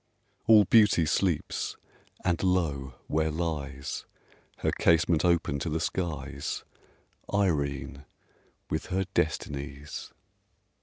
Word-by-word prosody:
All 110 Hz, -2 st, +8 dB
Beauty 105 Hz, -5 st, +5 dB
sleeps! 80 Hz, +1 st, 0 dB, 0.5 s
and 90 Hz, -2 st, +1 dB
lo! 75 Hz, -9 st, 0 dB
where 80 Hz, +1 st, +1 dB
lies 75 Hz, -4 st, -3 dB, 0.6 s
(Her -, -, +4 dB
casement 80 Hz, -1 st, +3 dB
open 85 Hz, -5 st, +2 dB
to 80 Hz, -, -2 dB
the 80 Hz, +1 st, -1 dB
skies) 80 Hz, -5 st, -3 dB, 0.7 s
Irene, 70 Hz, -8 st, 0 dB, 0.6 s
with -, -, -3 dB
her 95 Hz, +1 st, 0 dB
Destinies! 70 Hz, -2 st, -3 dB
80 Hz, 95 wpm, -28 LUFS, 70-90 Hz, 0.7 s, All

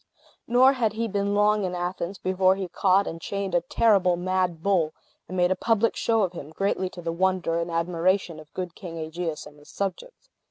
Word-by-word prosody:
Nor 255 Hz, +3 st, +5 dB
had 230 Hz, -5 st, 0 dB
he 230 Hz, +1 st, -2 dB
been 200 Hz, -1 st, -1 dB
long 210 Hz, 0 st, +3 dB
in 180 Hz, -1 st, -2 dB
Athens 180 Hz, +1 st, -3 dB
before 185 Hz, 0 st, +2 dB
he 190 Hz, -1 st, -4 dB
caught 190 Hz, +2 st, +2 dB
and 165 Hz, 0 st, -6 dB
chained 200 Hz, -1 st, -3 dB
a 175 Hz, -, +3 dB
terrible 185 Hz, 0 st, +3 dB
mad 180 Hz, -2 st, -1 dB
bull, 175 Hz, -6 st, +1 dB, 0.3 s
and 185 Hz, -, -5 dB
made 180 Hz, 0 st, +3 dB
a -, -, +3 dB
public 225 Hz, +1 st, +1 dB
show 225 Hz, -2 st, +2 dB
of 185 Hz, -2 st, -1 dB
him, 150 Hz, -4 st, -8 dB
greatly 190 Hz, +2 st, -1 dB
to 175 Hz, -1 st, -10 dB
the 165 Hz, 0 st, -2 dB
wonder 180 Hz, -2 st, +1 dB
and 170 Hz, +1 st, -3 dB
admiration 170 Hz, +1 st, 0 dB
of 155 Hz, -1 st, -14 dB
good 180 Hz, -2 st, -4 dB
King 170 Hz, -3 st, -8 dB
Aegeus 160 Hz, 0 st, -4 dB
and 150 Hz, 0 st, -14 dB
his 145 Hz, -, -18 dB
subjects. 200 Hz, -, -5 dB
185 Hz, 205 wpm, -25 LUFS, 170-200 Hz, 0.3 s, Nor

